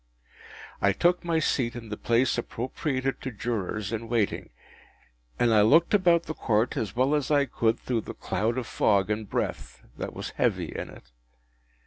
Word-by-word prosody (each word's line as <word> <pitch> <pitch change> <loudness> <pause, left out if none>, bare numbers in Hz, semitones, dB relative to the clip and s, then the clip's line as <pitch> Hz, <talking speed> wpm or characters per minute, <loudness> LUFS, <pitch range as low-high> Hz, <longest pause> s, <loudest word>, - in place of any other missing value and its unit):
I 100 - +4
took 175 - +2
my 170 -1 0
seat 125 -6 0
in 115 -2 -8
the 105 - -3
place 120 +4 +2
appropriated 130 +3 -3
to 130 - -3
Jurors 105 -2 -3
in 115 0 -4
waiting, 115 -4 0 0.9
and 120 -2 +3
I 105 - +6
looked 160 - +5
about 175 -4 +4
the 155 - -5
Court 115 -4 0
as 105 -1 -3
well 130 +4 +2
as 145 -3 0
I 145 -2 +4
could 115 -4 0
through 120 -3 -1
the - - -8
cloud 110 +6 -1
of 130 - -2
fog 100 0 +2
and 105 -1 -3
breath - - -3 0.2
that - - -5
was - - -5
heavy - - -1
in - - -5
it. - - -15
120 Hz, 175 wpm, -27 LUFS, 110-140 Hz, 0.9 s, I